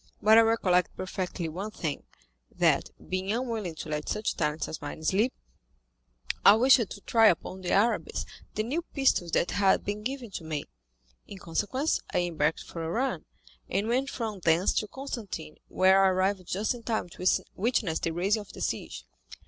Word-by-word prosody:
"But 220 +1 +7
I - - +8
recollect 195 -6 +2
perfectly 185 -2 -3
one 185 +7 -5
thing, 160 -8 -4 0.4
that, - - +2 0.2
being 185 +1 -2
unwilling 225 -7 -2
to 155 - -7
let 150 -1 -3
such 215 - -1
talents 150 -1 -1
as 160 - -6
mine 145 +2 -7
sleep, 205 +10 +2 1.1
I 200 - +9
wished 255 +5 +6
to 210 -4 -4
try 225 +1 +4
upon 185 +1 0
the 180 - -3
Arabs 225 +4 +1 0.3
the 215 - 0
new 280 +10 -1
pistols 270 - +1
that - - +2
had 195 -1 +3
been 205 +1 -3
given 250 -1 -5
to 175 - -6
me. 155 -2 -3 0.6
In 200 - -9
consequence 210 - -1
I - - +4
embarked 160 -3 0
for 165 - -7
Oran, 225 - -1 0.4
and 205 - 0
went 260 +4 +1
from 220 -7 -4
thence 170 +2 +3
to 215 - -5
Constantine, 215 - -6
where 190 +1 +4
I - - +6
arrived 185 0 0
just 210 +6 0
in 240 - -9
time 225 -5 -2
to 180 +2 -4 0.3
witness 200 -6 0
the - - -1
raising 190 +6 0
of 205 - -13
the - - -9
siege. - - -3
195 Hz, 175 wpm, -28 LUFS, 175-225 Hz, 1.1 s, I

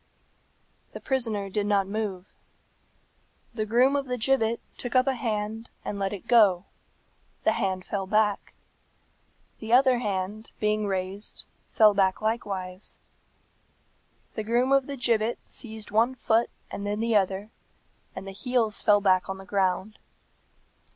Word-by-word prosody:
The - - -6
prisoner 225 -7 0
did 205 +1 -1
not 200 -2 +3
move. 200 -2 -3 1.3
The 215 -2 -2
groom 250 +5 +4
of 280 -1 -1
the 250 0 -2
gibbet 235 -1 +1 0.2
took 245 +1 -4
up 255 0 +5
a 270 - +2
hand 220 -1 -3 0.2
and 200 - -4
let 195 -1 -1
it 200 -3 -7
go; 205 -6 +5 0.8
the - - +4
hand 185 -1 -1
fell 195 -2 -3
back. 210 0 +1 1.0
The 225 +1 -3
other 255 -1 +5
hand, 205 0 -3
being 210 0 +1
raised, 190 +1 -3 0.3
fell 215 -2 +6
back 190 -1 +2
likewise. 195 -4 -3 1.4
The - - -3
groom 240 +4 +1
of 275 -1 +4
the 280 -1 -5
gibbet 235 -2 +1
seized 220 -4 -7
one 230 +5 +3
foot 230 -1 +2 0.2
and 200 - -5
then 205 +1 -2
the 230 0 +1
other, 195 +1 +1 0.6
and - - -7
the - - -5
heels 225 0 0
fell 205 -1 +4
back 185 -2 +3
on 190 - -3
the 190 - -11
ground. 195 +1 -1
215 Hz, 145 wpm, -27 LUFS, 195-235 Hz, 1.4 s, fell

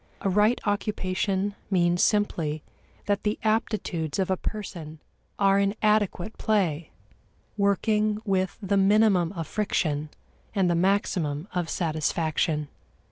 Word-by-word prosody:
A 195 - 0
right 210 +5 +3
occupation 200 -1 -1 0.2
means 175 -2 +2
simply 165 -8 0 0.4
that 205 -1 0
the 210 0 -1
aptitudes 215 -8 -1
of 190 -1 0
a - - +3
person 175 -7 -6 0.4
are 195 0 +4
in 200 +1 +1
adequate 210 -1 +1
play, 175 -8 0 0.7
working 210 +1 +1
with 190 -2 0
the 200 +1 +1
minimum 195 -3 +4
of 165 -4 -4
friction 155 -8 -1 0.5
and 185 -3 +2
the - - +3
maximum 170 -4 0
of 175 -2 -2
satisfaction. 155 -1 -1
195 Hz, 120 wpm, -26 LUFS, 170-210 Hz, 0.7 s, are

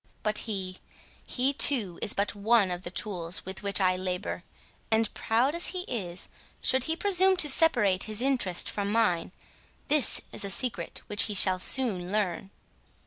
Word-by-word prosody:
—But 215 0 +1
he—he, 200 +7 -5
too, 225 -11 +1
is - - +2
but 200 +1 -2
one 205 -1 +2
of 175 0 -5
the 180 - -6
tools 175 -2 -2
with 190 +1 -7
which 200 0 0
I 185 -1 +1
labour; 185 -1 -5 0.5
and, 220 -1 0
proud 240 +6 0
as 340 +1 0
he 365 - -3
is, 185 - -5 0.3
should 260 -1 +2
he 320 - -2
presume 380 0 +4
to 325 - +2
separate 240 - +3
his 215 -1 -1
interest 245 -9 +1
from 205 -1 -3
mine, 180 -7 0 0.6
this 295 -4 +6
is - - -3
a 200 - -4
secret 195 -5 -1
which 205 -1 0
he 210 - -4
shall 185 -1 +3
soon 190 -6 +1
learn." 195 -3 -2
205 Hz, 165 wpm, -27 LUFS, 185-255 Hz, 0.6 s, this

